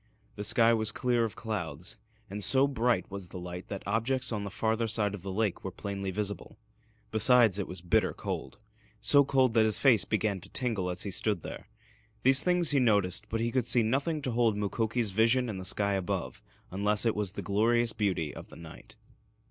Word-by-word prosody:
The 105 - -5
sky 115 +2 +4
was 110 -1 0
clear 120 -2 0
of 110 - -6
clouds 100 -1 -5 0.3
and 100 0 -4
so 135 +4 +4
bright 120 -9 0
was 100 -2 -7
the 95 - -8
light 90 0 -7
that 100 - -6
objects 130 +3 -1
on 105 -2 -3
the 100 - -5
farther 110 +3 -1
side 105 -2 +1
of 105 - -7
the 95 +1 -6
lake 105 -1 -1
were 95 - -3
plainly 100 +1 -5
visible. 100 +1 -4 0.5
Besides, 110 -2 +4
it 100 - -3
was 90 -1 -8
bitter 90 - +1
cold - - -6 0.4
so 140 +6 +5
cold 130 -3 +2
that 115 -1 +4
his 110 -1 +2
face 125 -7 +4
began 100 -3 -1
to 95 - -6
tingle 110 -8 -1
as 90 0 -1
he 100 - -4
stood 100 -2 -1
there. - - -9 0.5
These 135 +1 +6
things 180 -3 +1
he 140 - +3
noticed, 100 -6 +1
but 115 0 -2
he 115 +1 -1
could 125 -2 0
see 120 -1 +4
nothing 140 +7 -1
to 130 - -2
hold 115 -3 +1
Mukoki's 110 +2 -1
vision 115 +5 +2
in 100 -3 -5
the 95 - -7
sky 100 +2 +1
above 90 -9 -3 0.3
unless 105 +3 0
it 115 - +1
was 105 -2 -2
the - - -6
glorious 115 +3 +2
beauty 95 -8 -1
of - - -10
the - - -13
night. 85 +6 -13
110 Hz, 205 wpm, -29 LUFS, 100-120 Hz, 0.5 s, These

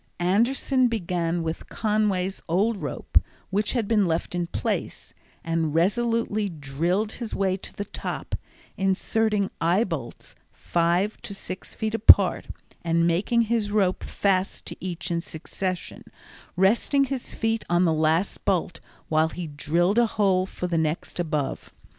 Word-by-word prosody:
Anderson 240 +8 +2
began 175 -6 -1
with 160 0 -4
Conway's 205 -3 0
old 205 +6 +2
rope, - - 0 0.3
which 205 +2 +1
had 235 -5 0
been 210 -4 +3
left 165 +1 -1
in 175 -1 -1
place, - - -3 0.3
and 165 -2 -1
resolutely 215 +3 +1
drilled 170 +7 -1
his 230 -1 -5
way 190 -1 +1
to - - -7
the 205 - -4
top, - - -6 0.4
inserting 200 +2 +1
eye 175 +6 +3
bolts 150 - -6 0.2
five 175 +5 0
to 200 - -6
six 185 -1 -7
feet 220 -1 -2
apart, 200 -4 +6 0.4
and 170 0 +2
making 200 +8 +2
his 225 -2 0
rope 200 -3 +1
fast 195 -1 0
to - - -7
each 180 0 -3
in 170 0 0
succession, 180 +3 -5 0.5
resting 225 +9 +3
his 270 -2 -4
feet 225 -1 0
on 175 +1 +3
the 165 - +3
last 160 +4 +1
bolt 180 -3 0 0.3
while 155 0 +3
he 175 +1 -6
drilled 170 +7 +1
a 240 - +4
hole 190 -3 +2
for 180 - -5
the 170 -2 0
next 160 +3 -2
above. 155 -5 -2
185 Hz, 145 wpm, -25 LUFS, 170-215 Hz, 0.5 s, apart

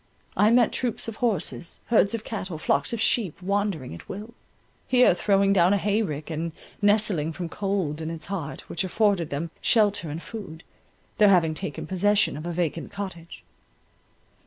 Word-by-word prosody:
I 210 - +5
met 235 -1 +4
troops 245 -3 -2
of 225 -1 -6
horses, 205 -7 -1
herds 230 -1 +3
of 220 - -5
cattle, 190 -7 -5
flocks 155 - +1
of 235 - -2
sheep, 215 -6 +1
wandering 195 - -1
at 85 - -11
will; 210 +4 -7 0.5
here 250 -6 +5
throwing 195 +1 +3
down 180 0 +4
a - - +3
hay 205 +2 +1
rick, 155 -5 -4
and 160 +1 -3 0.3
nestling 205 -7 +2
from 170 +1 -5
cold 190 -6 -2
in 160 - -3
its 165 -1 -6
heart, 175 -7 -4
which 170 - -3
afforded 190 -3 +1
them 155 +4 -3
shelter 205 -7 +2
and 155 +3 -5
food—there 205 +1 -3
having 170 -5 +4
taken 155 +1 -5
possession 200 +3 +2
of 155 +3 -6
a - - -2
vacant 170 -1 -2
cottage. 185 -5 -7
190 Hz, 165 wpm, -25 LUFS, 165-210 Hz, 0.5 s, I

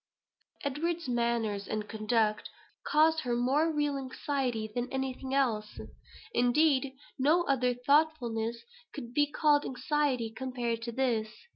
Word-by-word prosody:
'" - - -25
Edward's 330 +4 -2
manners 235 -4 0
and 215 -1 -3
conduct 215 0 0 0.3
caused 320 +1 +3
her 245 -5 -1
more 275 +7 +2
real 295 -2 0
anxiety 260 -4 -2
than 245 +1 -3
anything 265 0 -3
else. 220 -6 0 0.5
Indeed, 265 +2 +3 0.2
no 310 +6 +4
other 250 -5 +1
thoughtfulness 245 -4 +1 0.3
could 240 -5 -7
be 290 +2 +3
called 295 -1 +3
anxiety 260 -3 -1
compared 245 -3 -3
to 235 0 -4
this. 230 -3 0
255 Hz, 125 wpm, -30 LUFS, 235-290 Hz, 0.5 s, no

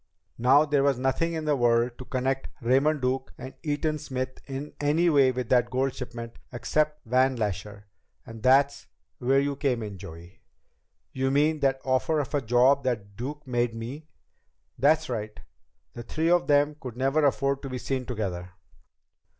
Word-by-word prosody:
"Now 135 +5 +5
there 145 -2 +2
was 140 -2 +2
nothing 135 +6 0
in 160 -1 -3
the 150 -1 +2
world 120 -1 +2
to 130 - -7
connect 130 +1 -1
Raymond 135 +4 +2
Duke 130 +1 -1
and 130 +1 -8
Eaton 155 0 -1
Smith 130 -2 -4
in 140 +2 -6
any 160 +4 +3
way 135 -3 +5
with 125 -2 -4
that 125 -1 +3
gold 130 +1 0
shipment 120 -2 -7
except 150 +4 -1
Van 130 +3 +2
Lasher. 105 -1 -4 0.4
And 115 -1 -10
that's 135 +3 +3 0.3
where 135 +2 +3
you 140 0 -1
come 130 -5 -1
in, 100 -3 -7
Joey." 85 -1 -11 0.7
"You 130 0 0
mean 150 +3 +2
that 135 -1 +1
offer 135 +4 +1
of 145 - -4
a 145 - +1
job 125 +4 +3
that 105 -6 -3
Duke 145 +6 -6
made 120 -2 -1
me?" 130 +7 -7 0.7
"That's 155 +5 +3
right. 110 -3 -5 0.5
The 120 - -7
three 160 +7 -1
of 175 0 +3
them 145 0 +3
could 125 -4 -8
never 135 +4 +1
afford 140 -1 +1
to 135 - -6
be 130 - -4
seen 130 -1 -3
together. 95 -7 -4
130 Hz, 170 wpm, -27 LUFS, 120-145 Hz, 0.7 s, Now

